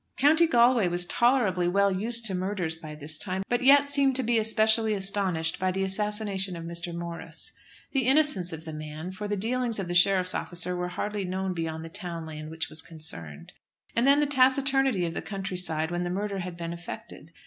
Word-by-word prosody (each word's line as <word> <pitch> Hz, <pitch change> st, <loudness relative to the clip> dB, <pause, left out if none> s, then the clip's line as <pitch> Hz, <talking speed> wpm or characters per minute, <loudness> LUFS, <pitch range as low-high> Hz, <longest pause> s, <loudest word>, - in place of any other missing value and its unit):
County 315 Hz, +5 st, +5 dB
Galway 240 Hz, -, +4 dB
was 175 Hz, 0 st, 0 dB
tolerably 210 Hz, -5 st, +2 dB
well 200 Hz, +2 st, +2 dB
used 225 Hz, +5 st, 0 dB
to 200 Hz, -, 0 dB
murders 185 Hz, -3 st, -2 dB
by 155 Hz, -2 st, -9 dB
this 150 Hz, +1 st, -6 dB
time, 190 Hz, -1 st, -2 dB
but 245 Hz, -, +1 dB
yet 280 Hz, +2 st, +6 dB
seemed 280 Hz, -2 st, +3 dB
to 260 Hz, -, +1 dB
be 230 Hz, -1 st, +2 dB
specially 220 Hz, 0 st, +3 dB
astonished 190 Hz, -5 st, 0 dB
by 185 Hz, -, +1 dB
the 195 Hz, +1 st, -2 dB
assassination 195 Hz, -1 st, +1 dB
of 165 Hz, -, -7 dB
Mr. 170 Hz, +1 st, -4 dB
Morris. 170 Hz, 0 st, -7 dB, 0.4 s
The 265 Hz, -3 st, 0 dB
innocence 270 Hz, -, +3 dB
of 160 Hz, 0 st, -8 dB
the 160 Hz, -, -7 dB
man; 155 Hz, +3 st, -7 dB
for 210 Hz, +2 st, -6 dB
the 205 Hz, 0 st, -2 dB
dealings 235 Hz, +2 st, 0 dB
of 195 Hz, -3 st, -3 dB
the 175 Hz, -, -3 dB
sheriff's 185 Hz, 0 st, +3 dB
officer 180 Hz, 0 st, -2 dB
were 180 Hz, 0 st, -2 dB
hardly 205 Hz, +3 st, -3 dB
known 190 Hz, +1 st, -3 dB
beyond 160 Hz, -1 st, -4 dB
the -, -, -8 dB
town 170 Hz, -3 st, -6 dB
land 155 Hz, -1 st, -8 dB
which 160 Hz, 0 st, -4 dB
was 155 Hz, +1 st, -6 dB
concerned! 85 Hz, -, -9 dB, 0.4 s
And 235 Hz, +3 st, +2 dB
then 280 Hz, +1 st, +6 dB
the 295 Hz, -, +3 dB
taciturnity 270 Hz, -5 st, +3 dB
of 165 Hz, -, -3 dB
the -, -, -4 dB
county 195 Hz, -2 st, -5 dB
side 160 Hz, -2 st, -1 dB
when 175 Hz, 0 st, -2 dB
the 175 Hz, -, -2 dB
murder 200 Hz, +2 st, -3 dB
had 180 Hz, -1 st, -6 dB
been 170 Hz, 0 st, -5 dB
effected! 170 Hz, 0 st, -9 dB
190 Hz, 205 wpm, -27 LUFS, 170-225 Hz, 0.4 s, yet